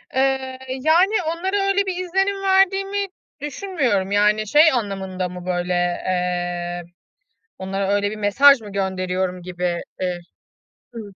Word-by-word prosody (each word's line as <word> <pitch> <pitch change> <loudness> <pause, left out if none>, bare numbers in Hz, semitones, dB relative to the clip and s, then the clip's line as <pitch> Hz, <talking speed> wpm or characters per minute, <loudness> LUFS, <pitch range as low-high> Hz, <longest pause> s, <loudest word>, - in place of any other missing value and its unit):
Eee, 265 -1 0 0.2
yani, 360 +6 +3
onlara 375 +5 -1
öyle 395 0 +2
bir 375 -2 -2
izlenim 390 +2 0
verdiğimi 390 +1 +2 0.3
düşünmüyorum. 280 - -1
Yani, 210 +1 +2
şey 305 +7 +6
anlamında 190 -6 -3
mı? 180 0 -9
Böyle, 180 0 -1 0.3
eee, 175 -1 -2 0.8
onlara 190 +1 -3
öyle 205 0 +1
bir 215 - -6
mesaj 250 +7 +5
mı 210 -2 -10
gönderiyorum 185 -2 -2
gibidir. 175 -1 -3 1.1
Hı. 230 - -6
210 Hz, 120 wpm, -21 LUFS, -, 1.1 s, şey